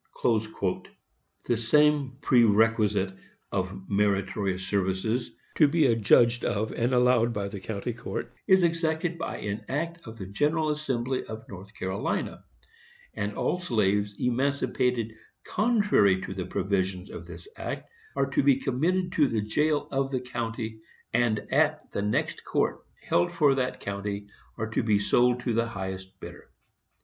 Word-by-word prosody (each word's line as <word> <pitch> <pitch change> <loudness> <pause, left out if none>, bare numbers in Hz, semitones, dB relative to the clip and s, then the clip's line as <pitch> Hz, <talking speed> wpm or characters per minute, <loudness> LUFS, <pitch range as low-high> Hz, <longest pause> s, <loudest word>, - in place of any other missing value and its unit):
The 120 - +1
same 140 +3 +3
pre 125 -2 +5
requisite 105 -3 +3 0.4
of 95 0 -3
"meritorious 100 -1 0
services, 100 +5 0 0.3
to 155 - +7
be 155 +1 +3
adjudged 115 0 +4
of 110 +1 -1
and 120 +2 0
allowed 125 -2 +3
by 100 -2 -2
the 100 0 -6
county 110 +4 -4
court," 120 +1 -5
is 190 -2 +6
exacted 165 0 0
by - - -3
an 105 +1 -4
act 165 +2 -3
of 110 0 -9
the 95 - -6
General 150 - +1
Assembly 135 -4 -1
of 110 0 -8
North 95 +2 -11
Carolina; 95 +2 -3 0.7
and - - -3
all 180 - 0
slaves 105 - +1
emancipated 125 -2 0 0.3
contrary 205 - +3
to 95 - -5
the 95 -2 -4
provisions 95 -1 -1
of 85 0 -8
this 85 -1 -9
act - - -5 0.3
are 135 0 +2
to - - +3
be 140 -1 +5
committed 165 +8 0
to 150 -5 +3
the 115 -4 0
jail 150 +8 +1
of 135 0 0
the 130 -2 -1
county, 115 -3 -4 0.3
and 115 -3 +1
at 155 +1 +2
the - - -2
next 105 +1 -1
court - - 0 0.2
held 85 0 +2
for 150 -4 +4
that 130 -1 -1
county 100 0 -4 0.3
are 110 0 -3
to - - +1
be 110 -2 +3
sold 125 +4 +3
to 120 - -1
the 115 +1 +1
highest 95 -3 -6
bidder. - - -11
115 Hz, 150 wpm, -27 LUFS, 100-135 Hz, 0.7 s, to